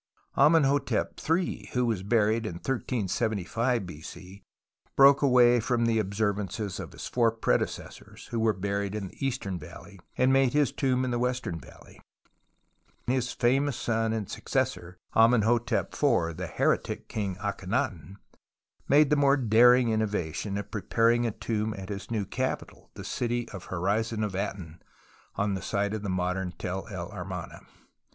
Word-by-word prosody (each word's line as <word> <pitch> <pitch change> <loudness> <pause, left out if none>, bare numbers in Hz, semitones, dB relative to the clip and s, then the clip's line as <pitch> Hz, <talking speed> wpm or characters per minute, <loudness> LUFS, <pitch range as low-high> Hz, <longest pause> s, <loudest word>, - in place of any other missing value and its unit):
Amenhotep 145 -1 +3
III, 170 +3 0
who 125 0 +2
was 110 -5 0
buried 110 +2 +1
in 90 - -4
1375 115 0 -1
B.C., 90 +4 -10 0.5
broke 140 0 +7
away 125 -3 +5
from 120 +1 0
the 115 -1 +2
observances 100 0 -2
of - - -7
his - - -8
four 120 -2 +2
predecessors 110 - -3
who 115 - -1
were 110 0 +3
buried 100 0 -2
in 100 -3 -4
the - - -10
Eastern 100 -9 -2
Valley 75 - -12 0.2
and 130 +1 +4
made 135 -1 +3
his 145 -2 +3
tomb 130 -1 0
in 125 - -2
the 120 - 0
Western 125 -9 -2
Valley; - - -16 1.0
and 125 - +1
his 125 -1 0
famous 135 +2 +1
son 115 -1 0
and 110 -3 -2
successor, 90 +1 -2 0.2
Amenhotep 115 +1 +3
IV, 110 - +1
the 90 0 -5
heretic - - 0
king 100 -4 -3
Akhenaton, 100 - -3 0.7
made 145 +1 +5
the - - +5
more 140 -1 +4
daring 120 0 +5
innovation 105 -3 -1
of 100 0 -6
preparing 115 +3 +2
a - - -1
tomi) 110 0 -3
at 95 0 -8
his 100 -1 -6
new 110 -4 -1
capital, 130 +6 -4
the - - -8
City 120 0 -2
of 95 - -7
the - - -15
Horizon 110 +5 -1
of 105 -3 -2
Aton, 95 -4 -5 0.5
on 100 0 0
the 95 - -3
site 100 +2 -1
of 110 - -3
the 100 - -4
modern 90 0 -1
Tell 95 +2 -5
el 95 -3 -6
Amarna. 90 -3 -6
110 Hz, 155 wpm, -28 LUFS, 95-125 Hz, 1.0 s, broke